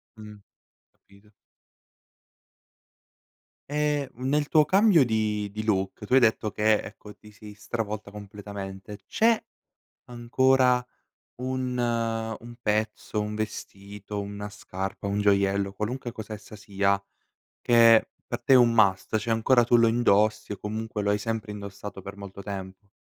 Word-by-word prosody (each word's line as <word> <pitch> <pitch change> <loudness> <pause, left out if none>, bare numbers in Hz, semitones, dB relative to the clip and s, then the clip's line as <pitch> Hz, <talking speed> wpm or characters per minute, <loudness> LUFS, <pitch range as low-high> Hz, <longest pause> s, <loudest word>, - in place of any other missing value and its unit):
Mh, 105 -1 -11 0.5
capito. 100 +1 -24 2.4
E 150 -2 0
nel 140 +4 -1
tuo 155 -2 +5
cambio 195 -2 +5
di 105 -3 -1
di 110 +1 -5
look, 95 -1 -1
tu 115 - -3
hai 130 - +7
detto 110 -2 +2
che 105 +1 +2
ecco 105 0 -11
ti 105 0 -17
sei 105 +1 -12
stravolta 105 0 -5
completamente, 100 -1 -8
c'è 225 - +3 0.7
ancora 125 +1 +2 0.6
un 130 -1 -2
un 115 -1 -2
pezzo, 105 0 -1
un 105 0 -3
vestito, 100 -1 -6
una 100 +1 -6
scarpa, 95 -1 -6
un 100 +1 -1
gioiello, 100 -1 +2
qualunque 120 +4 -4
cosa 110 -1 -8
essa 105 0 -9
sia, 100 -1 0 0.6
che 115 -2 +6 0.2
per 120 0 -4
te 135 - +4
è - - +9
un 120 -2 +5
must 100 -1 +3
cioè 110 +2 -3
ancora 120 +2 +4
tu 120 +1 +3
lo 115 -1 +5
indossi 110 -2 +2
o 105 - -4
comunque 110 0 -4
lo 100 - 0
hai 105 - +2
sempre 110 0 -4
indossato 100 -1 -8
per 100 +1 -8
molto 100 0 -10
tempo? 95 0 -8
105 Hz, 140 wpm, -26 LUFS, 100-120 Hz, 2.4 s, è